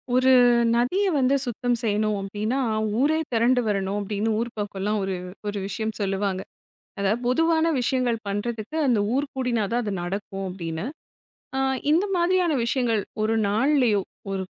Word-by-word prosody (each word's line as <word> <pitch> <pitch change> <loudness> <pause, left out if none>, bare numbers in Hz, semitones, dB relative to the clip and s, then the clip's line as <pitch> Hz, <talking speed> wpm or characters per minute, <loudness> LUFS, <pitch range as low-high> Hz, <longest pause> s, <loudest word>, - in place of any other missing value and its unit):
ஒரு 260 +1 +5 0.4
நதிய 255 +13 +2
வந்து 265 0 +3
சுத்தம் 245 +1 -1
செய்யணும் 215 -2 0
அப்டின்னா, 210 +6 -2 0.4
ஊரே 300 +4 +3 0.2
திரண்டு 245 +2 +3
வரணும் 195 -1 -1
அப்டின்னு 210 +2 -1
ஊர் 235 - -1
பக்கம்லாம் 205 0 -2
ஒரு, 190 -1 -2 0.3
ஒரு 205 0 -2
விஷயம் 220 +2 -3
சொல்லுவாங்க. 195 -1 -1 0.6
அதா 200 0 +2
பொதுவான 325 +6 +3
விஷயங்கள் 250 -1 +1
பண்றதுக்கு 215 +5 -3
அந்த 240 -4 +3 0.2
ஊர் 280 +2 +1
கூடினா 250 -4 0
தான் 240 +1 +1
அது 205 -2 -2
நடக்கும் 195 +2 -4
அப்டின்னு. 170 -1 -5 0.7
ஆ, - - +1 0.3
இந்த 340 +6 +3
மாதிரியான 350 -1 +2
விஷயங்கள் 235 -3 +1 0.2
ஒரு 220 +1 +1
நாள்லேயோ, 230 -1 +3 0.3
ஒரு 195 -1 -2
225 Hz, 140 wpm, -24 LUFS, 200-255 Hz, 0.7 s, ஒரு